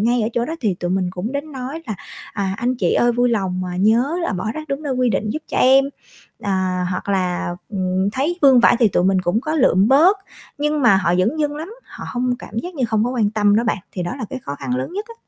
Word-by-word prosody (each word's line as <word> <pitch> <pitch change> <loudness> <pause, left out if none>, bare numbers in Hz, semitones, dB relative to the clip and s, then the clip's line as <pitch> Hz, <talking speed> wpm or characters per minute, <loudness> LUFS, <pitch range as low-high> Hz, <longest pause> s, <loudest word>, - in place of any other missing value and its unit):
ngay 235 +2 +2
ở 215 - 0
chỗ 235 - 0
đó 320 - -4
thì 210 -6 +1
tụi 175 0 -4
mình 185 -1 0
cũng 185 +8 -5
đến 285 +2 -4
nói 270 +5 -6
là 215 - -3 0.4
"À, 195 -3 -2
anh 245 +4 0
chị - - +1
ơi 240 0 +3
vui 245 +1 +2
lòng, 190 -5 -1
à, - - -4
nhớ 230 - +2
là 335 - -1
bỏ 185 +3 -3
rác 310 -1 -7
đúng 275 +2 -3
nơi 285 -3 -2
quy 255 -1 +1
định 215 - -1
giúp 310 - -4
cho - - -4
em." 265 +1 +6 0.6
À, 185 -2 0
hoặc 185 - -4
là, 185 -3 0 0.2
ừm, 190 -1 -1
thấy 295 +9 -1
vương 265 -3 +7
vãi 240 - +5
thì 230 - +5
tụi 180 -2 +1
mình 190 0 +3
cũng 185 +5 0
có 305 +4 -3
lượm 215 - +4
bớt, 320 +10 +5 0.4
nhưng 300 0 0
mà 230 -6 +6
họ 180 -2 +1
dửng 215 +12 +1
dưng 295 -1 -1
lắm, 315 +3 -6 0.2
họ - - -10
hông 250 0 0
cảm 220 - -7
giác 355 +8 -5
như 265 -5 -1
hông 220 0 +1
có 245 - -1
quan 225 -5 +1
tâm 205 -1 +3
đó 230 - +2
bạn, 215 -2 0
thì 180 - -3
đó 175 - -3
là - - -3
cái 265 - -4
khó 140 - -5
khăn 130 -3 -3
lớn 130 - -4
nhất 410 +3 -3
á. 460 - -10
230 Hz, 270 wpm, -20 LUFS, 190-270 Hz, 0.6 s, vương